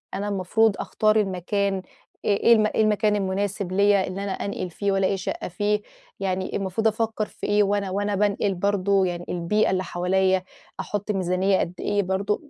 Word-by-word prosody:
أنا 200 +1 -3
المفروض 200 +2 +2
أختار 215 0 +1
المكان 195 0 0 0.4
إيه 200 -1 +3
إيه 235 - +7
الم 215 -2 +4
إيه 220 - 0
المكان 210 0 +2
المناسب 195 -1 -2
ليّا 200 0 +3
إن 185 - -5
أنا 200 -1 -3
أنقل 195 -2 -4
فيه، 200 +4 -2
وألاقي 195 0 +1
شقة 190 - -4
فيه؟ 205 +4 0 0.4
يعني 185 -1 -2
المفروض 195 +3 0
أفكّر 220 0 -1
في - - -8
إيه 205 0 +4
وأنا 200 -1 0
وأنا 205 +1 -1
بانقل 205 0 +1
برضو، 200 0 +2
يعني 175 -1 -3
البيئة 180 +5 +1
اللي 185 0 0
حواليّا، 185 +1 +1 0.4
أحُطّ 205 +1 -3
ميزانية 190 0 +1
قد 175 - -2
إيه 205 0 0
برضه؟ 200 - -2
200 Hz, 175 wpm, -24 LUFS, 190-205 Hz, 0.4 s, إيه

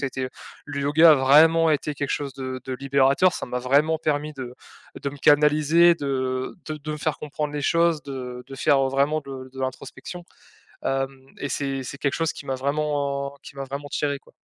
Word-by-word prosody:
ça 140 - 0
été 130 0 -3 0.4
le 145 -1 -5
yoga 155 +4 +6
a - - +7
vraiment 160 +5 +5
été 150 0 -1
quelque 145 0 -3
chose 140 -2 -5
de 130 -1 -5
de 130 - -5
libérateur, 140 +6 +3
ça - - -5
m'a 125 0 -3
vraiment 145 +5 +2
permis 150 -1 -1
de 130 -3 -7 0.5
de 140 - -3
me 145 - -10
canaliser, 150 +4 +5
de 130 -2 -2
de 155 - -3
de 150 +1 -5
me - - -4
faire 155 0 -1
comprendre 150 0 -4
les 145 -1 -3
choses, 165 0 +2
de 125 -2 -6
de 135 - -9
faire, 135 +1 +3
heu, - - +1
vraiment 140 +3 +1
de 135 -2 -9
de 135 - -8
l'introspection. 135 +6 -6 0.6
Hem, 135 0 -2
et 145 - -3
c'est 135 0 -2
c'est 140 +2 -7
quelque 140 -2 -1
chose 165 0 0
qui 140 - -10
m'a 135 - -2
vraiment 140 0 -1
qui 140 - -12
m'a 135 - -4
vraiment 140 +2 -6
tiré 145 -1 -1
quoi. - - -22
140 Hz, 210 wpm, -24 LUFS, 135-150 Hz, 0.6 s, a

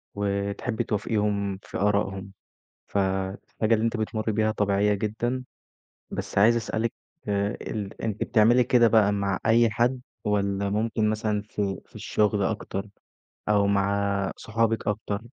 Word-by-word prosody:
وتحبي 100 +3 -1
توافقيهم 105 -2 -1
في - - -6
آرائهم، 100 -1 0 0.6
فالحاجة 95 +3 -1
اللي 110 +1 +2
أنتِ 115 0 0
بتمُرّي 110 0 -1
بيها 110 0 +2
طبيعية 105 0 +2
جدًا، 115 +5 -2 0.7
بس - - -5
عايز 115 +4 +6
أسألِك 115 0 -1 0.3
آآ، 100 0 0
ال 105 -3 -5
أنتِ 110 -2 -1
بتعملي 120 +3 +4
كده 120 -1 +5
بقى 110 -3 +4
مع 100 -1 0
أي 115 0 +5
حد 120 +4 +1 0.2
والّا 100 -1 0
ممكن 110 +1 0
مثلًا 110 -1 0
في 100 -2 -3
في - - -27
الشغل 105 -1 +1
أكتر 100 -1 -3 0.6
أو 100 -1 +4
مع 100 0 +1
صحابك 115 -1 0
أكتر 105 0 -2
105 Hz, 135 wpm, -26 LUFS, 100-110 Hz, 0.7 s, عايز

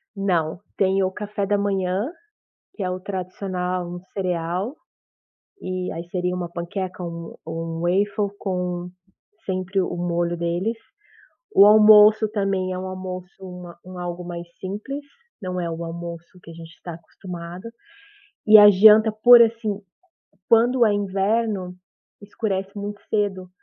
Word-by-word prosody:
Não, 175 -5 -1 0.2
tem 195 0 +2
o 185 - 0
café 205 0 -4
da 205 +1 +1
manhã, 195 +1 -1 0.7
que 205 - -6
é 180 - -1
o 185 - -3
tradicional 185 -2 -4
cereal, 180 - -2 0.9
e 185 0 -4
aí 170 +1 -6
seria 180 0 -1
uma 175 -1 -4
panqueca 180 +2 -5
ou 170 - -4
um 170 0 -8
ou 165 0 -4
um 165 0 -5
waffle 200 +4 0
com 180 -2 -3 0.6
sempre 190 +1 -1
o 180 - -2
molho 175 0 -1
deles. 175 +7 -2 0.8
O 200 - +8
almoço 215 0 +7
também, 195 -3 -1
é 185 - -4
um 190 - -5
almoço, 185 -1 -6
uma 180 -2 -10
um 185 -1 -9
algo 175 0 -5
mais 175 0 -7
simples, 215 +10 -6 0.4
não 180 -1 -3
é 170 - -3
o 165 +1 -5
almoço 170 +1 -8
que - - -13
a - - -9
gente 165 0 -12
está 175 - -8
acostumado. 175 +3 -9 0.8
E 215 0 +9
a 205 0 +10
janta, 215 +3 +7
por 240 +3 +7
assim, 225 -3 +2 0.7
quando 240 +2 +4
é 210 - +3
inverno, 200 -1 -1 0.5
escurece 200 -2 -3
muito 205 0 -6
cedo. 195 -4 -1
185 Hz, 145 wpm, -23 LUFS, 175-205 Hz, 0.9 s, a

